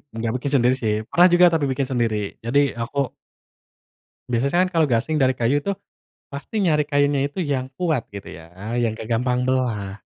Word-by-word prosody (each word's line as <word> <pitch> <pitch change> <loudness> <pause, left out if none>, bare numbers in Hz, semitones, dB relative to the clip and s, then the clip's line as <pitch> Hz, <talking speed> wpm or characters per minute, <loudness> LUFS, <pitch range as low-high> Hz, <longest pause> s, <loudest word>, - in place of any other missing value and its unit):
nggak 115 0 -2
bikin 135 +2 -3
sendiri 125 0 +3
sih. 110 -1 +1 0.2
Pernah 175 +1 +6
juga 175 +1 +7
tapi 160 -3 +1
bikin 135 0 -1
sendiri. 115 -4 0 0.3
Jadi 125 +5 +2 0.2
aku 120 +4 -6 1.3
Biasanya 135 +7 +1
kan - - -8
kalau 165 -4 +2
gasing 140 +5 0
dari 130 -1 +3
kayu 120 +5 +1
tuh 200 +7 -3 0.5
pasti 140 +10 -6
nyari 160 -7 +3
kayunya 145 -1 +1
itu 145 - -11
yang 140 -6 -2
kuat 160 -9 -1
gitu 100 -1 -9
ya, 80 -1 -13 0.2
yang 120 -2 +1
nggak 110 - -7
gampang 125 +2 0
belah. 110 -6 -1
130 Hz, 175 wpm, -22 LUFS, 115-145 Hz, 1.3 s, juga